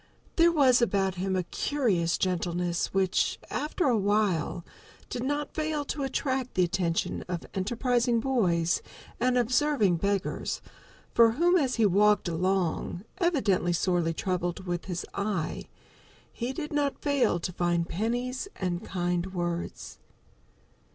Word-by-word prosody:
There 340 0 +5
was 265 -6 +5
about 195 -4 +2
him 190 +1 -2
a 185 - +1
curious 185 -7 0
gentleness 175 -1 -1
which, 190 -1 +1
after 305 +4 -1
a 255 -4 +4
while, 200 -5 +1 0.5
did 245 - -3
not 290 +2 -2
fail 310 -2 -1
to 290 - -4
attract 265 -1 -2
the 185 - +4
attention 175 -1 -1
of 175 -2 -4
enterprising 235 +4 +1
boys 180 -10 +1 0.4
and 250 0 +2
observing 245 - +2
beggars, 200 +2 -1 0.5
for 230 -1 +6
whom, 345 +7 +3
as 275 -8 +2
he 225 - +3
walked 205 +1 +4
along, 175 +1 -1 0.2
evidently 235 - +2
sorely 170 -2 +1
troubled 180 0 -2
with 175 -1 -3
his 180 -2 -4
eye, 200 -6 -2 0.7
he 240 +2 -3
did 300 +2 -5
not 290 -1 -1
fail 280 - +2
to 180 +1 -4
find 175 -1 0
pennies 245 - -2
and 180 -2 -2
kind 180 0 -2
words. 175 -1 -4
200 Hz, 130 wpm, -28 LUFS, 175-255 Hz, 0.7 s, for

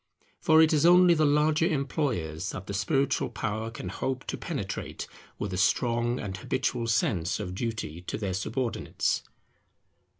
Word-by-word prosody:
For 160 0 +6
it 160 - +3
is 150 - +3
only 180 +1 +7
the 155 -2 +3
larger 150 +2 +3
employers 135 - -1
that 95 - -6
the 100 - -5
spiritual 135 +8 +1
power 110 +1 -3
can 115 - -7
hope 130 -1 -3
to - - -1
penetrate - - -5 0.3
with 100 -2 -4
a - - -2
strong 120 +4 +1
and 95 -2 -4
habitual 115 +4 -1
sense 110 -6 +1
of 90 -4 -4
duty 105 -6 -4
to 90 - -4
their 100 -4 -2
subordinates. 110 +5 -1
115 Hz, 155 wpm, -28 LUFS, 100-150 Hz, 0.3 s, only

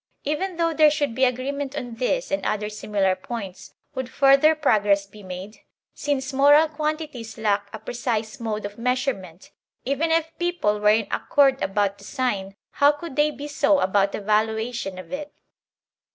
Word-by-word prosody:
Even 335 +5 -2
though 335 -1 +1
there 310 -1 +6
should 290 -4 -1
be 260 +3 +3
agreement 270 +3 -2
on 245 -4 -5
these 380 - -1
and 290 - -1
other 210 0 -1
similar 205 -3 0
points, 195 -1 -8 0.2
would 260 -1 -4
further 275 +4 +5
progress 205 -9 +2
be 210 +1 -15
made? 190 +2 -8 0.3
Since 275 -2 -2
moral 290 +3 +6
quantities 305 -6 -4
lack 205 -2 0
a - - -6
precise 235 0 -3
mode 215 -3 -3
of 205 +2 -8
measure 250 +3 +1
ment, 185 -4 -13 0.3
even 280 +5 0
if 325 0 0
people 345 -13 0
were 210 0 +4
in 215 0 +3
accord 275 -2 +2
about 200 +1 0
the - - -14
sign, 205 -8 -2 0.2
how 285 0 +5
could 295 -1 -8
they 295 +1 +3
be 290 -1 -7
so 290 0 +2
about 195 -2 +2
the - - -5
valuation 220 0 -1
of 185 - -9
it? 290 +1 -6
250 Hz, 170 wpm, -24 LUFS, 210-290 Hz, 0.3 s, there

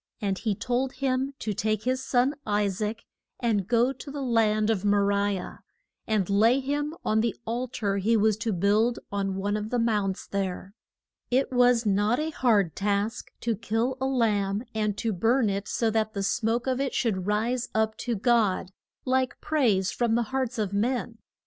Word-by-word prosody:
And 195 -4 -1
he 210 0 -1
told 255 +4 -1
him 270 0 -1
to 215 - -3
take 215 +1 -1
his 255 +2 -1
son, 260 +2 +2
I 210 0 +1
saac, 210 +3 -3 0.4
and 215 -6 0
go 240 +3 +3
to 275 - -10
the 280 0 -4
land 220 -3 +2
of 205 -3 -1
Mo 205 0 +3
ri 200 0 +1
ah, 180 - -7 0.5
and 210 -5 +1
lay 225 +6 +4
him 290 +3 -2
on 220 0 +2
the 230 0 -1
al 240 +3 -2
tar 200 -5 -2
he 220 +4 +2
was 215 0 +3
to 225 0 -2
build 210 +6 +2
on 195 -1 -1
one 200 +2 -1
of 210 0 -3
the 245 - 0
mounts 210 -5 0
there. 195 -1 -4 0.6
It 260 +2 +1
was 245 -2 +4
not 205 +3 +2
a 315 +1 -2
hard 210 - +2
task 205 +3 -1
to 230 -1 0
kill 230 +4 -1
a 265 - +1
lamb, 210 -5 +1
and 210 -2 -1
to 225 -2 -1
burn 225 +4 +2
it 200 +1 -3
so 225 -2 0
that 220 -1 -1
the 200 - -1
smoke 225 +4 0
of 260 -1 0
it 275 - -2
should 190 -6 0
rise 230 +4 0
up 220 0 +1
to 240 -2 -2
God, 210 -4 +1 0.3
like 260 0 0
praise 230 -12 +1
from 235 -2 +1
the 235 - +2
hearts 260 -2 -1
of 205 -3 -2
men. 230 +2 -1
220 Hz, 190 wpm, -27 LUFS, 205-245 Hz, 0.6 s, lay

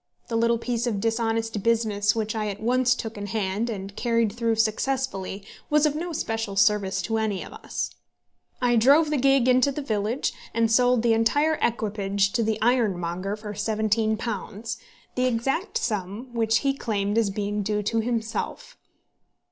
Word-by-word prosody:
The 230 - -2
little 235 +1 +3
piece 240 +1 -2
of 210 -4 -1
dishonest 225 0 -1
business 215 -2 +2
which 220 -1 -1
I 215 -1 -2
at 200 0 -4
once 245 +2 +2
took 225 -4 -6
in 205 - -4
hand 210 +2 -1
and 195 -2 -6
carried 230 -2 +1
through 230 -1 0
successfully 220 -3 -1 0.2
was 300 0 +4
of 300 - +2
no 340 +3 -4
special 225 -9 -3
service 200 -2 +2
to 225 +2 -1
any 215 -3 -1
of - - -11
us. - - -4 0.7
I 240 -1 +4
drove 290 +7 +5
the 300 - +2
gig 270 -1 +3
into 255 +2 +4
the 290 +1 -4
village, 220 +1 -1 0.2
and 230 -1 +2
sold 245 0 +4
the 235 -1 +4
entire 290 +8 +2
equipage 200 -3 0
to 235 - 0
the 220 -1 0
ironmonger 195 -6 0
for 210 -1 -7
£17, 220 +1 -1 0.4
the 255 - +1
exact 270 - 0
sum 215 - -3
which 225 -1 +2
he 275 - +3
claimed 205 -6 -2
as 225 -3 +2
being 205 +1 -2
due 210 +1 -1
to 225 +3 0
himself. 225 -1 -3
225 Hz, 165 wpm, -25 LUFS, 210-240 Hz, 0.7 s, drove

